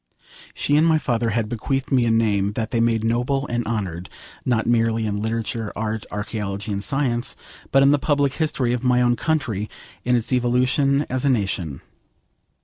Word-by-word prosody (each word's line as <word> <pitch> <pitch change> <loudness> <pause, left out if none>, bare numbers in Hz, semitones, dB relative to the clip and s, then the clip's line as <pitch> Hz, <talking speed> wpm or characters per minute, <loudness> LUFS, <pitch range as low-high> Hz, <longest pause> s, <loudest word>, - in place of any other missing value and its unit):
She 145 - +2
and 160 +2 +4
my 160 -1 +4
father 120 -5 0
had 110 0 0
bequeathed 130 +5 -2
me 125 -3 +3
a - - +2
name 105 -3 +2
they 115 - -1
had 115 - +1
made 115 -1 +2
noble 125 +5 0
and 120 -3 -2
honoured, 95 -6 -3 0.3
not 120 -3 +1
merely 115 -1 +2
in 105 -1 -2
literature, 110 0 -2
art, 110 0 -3
archaeology, 105 -1 -4
and 100 0 -2
science, 130 -3 0 0.4
but 135 0 +5
in 140 - +6
the 145 - +3
public 145 -1 +1
history 140 -6 0
of 125 0 -2
my 125 -1 +3
own 120 0 +3
country, 120 - -1 0.3
in 125 0 +2
its 120 +2 0
evolution 130 +3 +2
as 130 0 -2
a 140 - +3
nation. 95 - -1
120 Hz, 180 wpm, -22 LUFS, 110-130 Hz, 0.4 s, in